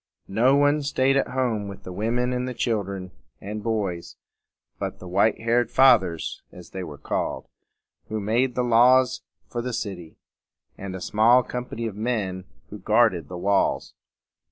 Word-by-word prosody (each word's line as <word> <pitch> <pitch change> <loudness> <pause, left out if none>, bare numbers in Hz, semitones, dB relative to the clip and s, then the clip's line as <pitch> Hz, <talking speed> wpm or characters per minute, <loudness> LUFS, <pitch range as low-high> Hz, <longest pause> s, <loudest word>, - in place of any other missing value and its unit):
No 125 +6 +4
one 145 +1 +3
staid 135 -1 +1
at 135 - +2
home 120 -6 -1
with 100 -1 -9
the 90 - -8
women 120 +5 -1
and 125 0 -3
children 100 -6 -2 0.3
and 105 +1 -6
boys 100 -6 -3 0.6
but - - -4
the 95 - -11
white 100 +5 +2
haired 115 0 +1
"Fathers," 110 -11 +3
as 90 -2 -13
they 95 - -5
were 75 -4 -8
called, - - -3 0.6
who 110 - -2
made 120 +5 0
the 125 - +1
laws 125 +1 +4 0.3
for 120 - -4
the 125 +1 -4
city, 95 -8 -5 0.6
and 95 -1 -7
a 95 - -7
small 115 +6 +4
company 125 -2 -5
of 110 -3 -4
men 105 -5 -2 0.3
who 105 - -8
guarded 105 -6 +2
the 90 - -7
walls. 100 +2 0
110 Hz, 155 wpm, -24 LUFS, 95-125 Hz, 0.6 s, No